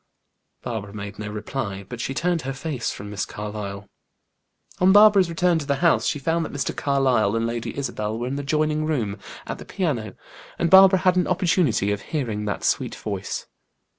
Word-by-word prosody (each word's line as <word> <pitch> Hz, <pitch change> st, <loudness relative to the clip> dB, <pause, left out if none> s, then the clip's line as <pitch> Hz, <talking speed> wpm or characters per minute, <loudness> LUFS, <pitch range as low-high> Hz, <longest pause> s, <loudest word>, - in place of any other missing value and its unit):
Barbara 105 Hz, -4 st, -5 dB
made 100 Hz, -1 st, -7 dB
no 105 Hz, -1 st, -4 dB
reply, 105 Hz, -2 st, -4 dB
but 120 Hz, 0 st, -6 dB
she 135 Hz, -, -3 dB
turned 170 Hz, +3 st, 0 dB
her 135 Hz, +1 st, -4 dB
face 135 Hz, -3 st, -3 dB
from 105 Hz, +1 st, -8 dB
Miss 100 Hz, -2 st, -2 dB
Carlyle. 105 Hz, -1 st, -6 dB, 0.9 s
On 185 Hz, +1 st, +5 dB
Barbara's 205 Hz, -3 st, +7 dB
return 170 Hz, 0 st, +2 dB
to 145 Hz, -, -5 dB
the 140 Hz, -, +2 dB
house, 170 Hz, +4 st, +2 dB
she 150 Hz, -, 0 dB
found 165 Hz, +4 st, 0 dB
that -, -, -5 dB
Mr. 145 Hz, -, -3 dB
Carlyle 130 Hz, -7 st, +2 dB
and 115 Hz, 0 st, 0 dB
Lady 115 Hz, 0 st, -4 dB
Isabel 110 Hz, -5 st, -3 dB
were 120 Hz, -, -3 dB
in 130 Hz, +2 st, -3 dB
the 145 Hz, -, -2 dB
adjoining 155 Hz, +2 st, 0 dB
room, 110 Hz, -10 st, -1 dB, 0.3 s
at -, -, -5 dB
the -, -, -8 dB
piano, 145 Hz, -, -2 dB, 0.4 s
and 170 Hz, -1 st, 0 dB
Barbara 190 Hz, 0 st, +8 dB
had 185 Hz, -1 st, +3 dB
an 180 Hz, -, +2 dB
opportunity 175 Hz, -, +2 dB
of 105 Hz, -, -2 dB
hearing 115 Hz, -9 st, -3 dB
that 100 Hz, -, -3 dB
sweet -, -, 0 dB
voice. -, -, -4 dB
135 Hz, 190 wpm, -23 LUFS, 105-165 Hz, 0.9 s, Barbara